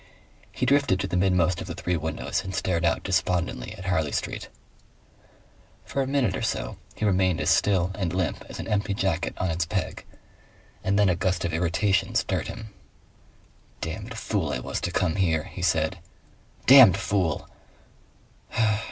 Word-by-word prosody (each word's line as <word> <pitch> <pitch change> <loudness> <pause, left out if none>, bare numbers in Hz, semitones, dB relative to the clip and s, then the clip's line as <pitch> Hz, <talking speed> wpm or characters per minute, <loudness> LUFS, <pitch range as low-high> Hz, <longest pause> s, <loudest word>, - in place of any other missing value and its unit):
He - - -2
drifted 140 -9 +3
to - - -1
the - - -3
midmost 90 -2 +2
of 95 - -6
the 85 - -5
three 90 0 -1
windows 80 -1 -2
and 95 0 -5
stared 85 -2 0
out 85 -1 +1
despondently 90 - -1
at 95 - -9
Harley 80 -6 0
Street. - - -3 1.4
For 140 - -2
a 135 - -1
minute 130 -8 +1
or - - -4
so - - -2 0.2
he - - -2
remained 95 -4 +2
as - - +2
still 95 -3 +2
and 95 -4 -2
limp 90 -2 -2
as - - -8
an - - -5
empty 100 -1 0
jacket 95 -2 -1
on 95 -2 -1
its 80 0 -1
peg, 95 +1 -3 0.8
and 100 +1 +1
then 105 -1 +4
a 90 - +3
gust 90 0 0
of 85 - -2
irritation 90 +4 +1
stirred - - 0
him. 110 -2 -8 1.1
"Damned 105 +8 -5
fool 95 -9 -1
I - - -1
was 65 - -4
to - - -2
come 85 -1 0
here," 80 -5 +2
he 90 - -9
said... 85 +1 +1 0.7
"DAMNED 125 -9 +9
fool! 95 -5 -1
90 Hz, 170 wpm, -26 LUFS, 85-100 Hz, 1.4 s, DAMNED